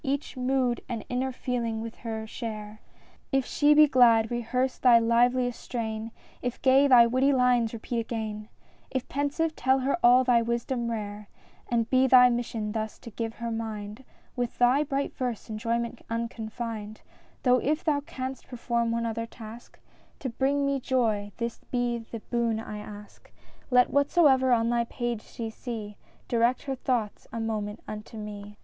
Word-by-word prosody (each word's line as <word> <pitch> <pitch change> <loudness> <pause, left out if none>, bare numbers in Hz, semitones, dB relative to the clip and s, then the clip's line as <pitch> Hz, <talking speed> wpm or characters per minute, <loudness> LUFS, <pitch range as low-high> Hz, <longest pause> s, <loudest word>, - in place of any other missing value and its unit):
Each 280 0 -2
mood 255 -1 0
and 230 -4 -4
inner 255 +2 -1
feeling 240 -3 -2
with 225 0 -7
her 220 -1 -5
share;— 215 -1 -7 0.5
If 270 -2 +2
she 295 0 +3
be 305 0 +8
glad 235 -4 +5
rehearse 250 +2 -1
thy 245 -2 +7
liveliest 245 +2 +2
strain; 220 -2 -4 0.3
If 245 -1 -3
gay, 270 +2 +6
thy 245 -3 +8
witty 255 +4 +2
lines 250 -3 +3
repeat 235 +1 -3
again; 220 -2 -4 0.4
If 260 -2 -3
pensive 290 +3 -1
tell 265 +1 +2
her 270 +2 +1
all 250 +2 +6
thy 245 -2 +4
wisdom 235 +1 -2
rare, 210 -2 -5 0.2
— - - -31
And 230 -2 +1
be 260 +1 +3
thy 250 -1 +7
mission 230 -3 -2
thus 220 0 -3
to 230 - -11
give 225 +1 -4
her 235 -1 -4
mind 220 0 -5 0.3
With 245 -2 -3
thy 250 +4 +4
bright 280 -1 -2
verse 245 -4 -4
enjoyment 235 +2 -2
unconfined; 230 -1 -5 0.4
Though 250 -1 +4
if 300 +5 0
thou 300 -3 +2
canst 265 -2 -6
perform 235 -2 -1
one 235 0 -1
other 230 0 -3
task 230 0 -12 0.4
To 265 - -4
bring 275 +4 0
me 280 0 0
joy, 225 -6 0
this 235 -1 -3
be 245 -1 0
the 225 0 -8
boon 235 -2 +1
I 210 -1 -6
ask: 210 0 -12 0.4
Let 250 -1 +4
whatsoever 280 -3 +4
on 230 -1 +3
thy 235 0 +1
page 240 -2 -3
she 225 0 -7
see 220 -3 -6 0.3
Direct 240 +1 +2
her 275 - -3
thoughts 245 -5 -2
a 230 - -4
moment 215 -2 -3
unto 215 +1 -8
me. 205 -1 -8
235 Hz, 165 wpm, -27 LUFS, 225-255 Hz, 0.5 s, be